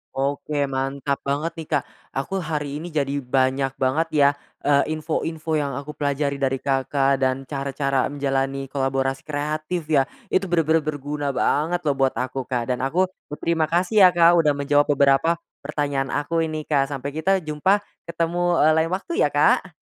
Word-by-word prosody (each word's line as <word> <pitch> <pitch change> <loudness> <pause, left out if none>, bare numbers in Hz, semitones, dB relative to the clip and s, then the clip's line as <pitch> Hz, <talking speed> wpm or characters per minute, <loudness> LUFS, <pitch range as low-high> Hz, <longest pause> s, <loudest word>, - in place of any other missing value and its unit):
Oke, 145 +2 -1
mantap 135 +1 -2
banget 145 +4 -1
nih, 160 - -7
Kak. 140 - +1 0.3
Aku 165 +9 -2
hari 150 -4 -3
ini 170 - -6
jadi 145 -3 -1
banyak 130 +1 0
banget 150 +6 +1
ya, 140 -1 +6 0.3
eee, 140 -1 +4
info-info 160 0 -2
yang 140 -3 -2
aku 140 +2 -6
pelajari 140 0 -1
dari 135 -1 +1
Kakak 135 0 +1
dan 130 +1 +1
cara-cara 135 -1 -1
menjalani 135 -1 -1
kolaborasi 135 -1 -1
kreatif 155 +3 -2
ya, 140 -3 +5 0.3
itu 195 - +3
bener-bener 165 -2 +3
berguna 145 -1 -3
banget 170 +4 +1
loh 145 - +3
buat 135 -1 +2
aku, 130 0 -3
Kak, 125 -1 -1
dan 125 - -4
aku 170 +8 +2 0.2
berterima 160 +1 0
kasih 185 +3 +5
ya, - - +5
Kak, 170 0 +6
udah 150 -2 +2
menjawab 145 +1 +2
beberapa 140 +5 +4 0.3
pertanyaan 140 -2 -2
aku 165 +3 -1
ini, 155 -1 -2
Kak. 140 -3 +2
Sampai 140 0 -4
kita 190 +5 +2
jumpa 170 +7 +1 0.3
ketemu, 170 +1 0
eee, 155 +1 +5
lain 165 - -1
waktu 335 - -3
ya, - - +4
Kak! - - +3
145 Hz, 165 wpm, -23 LUFS, 135-160 Hz, 0.3 s, ya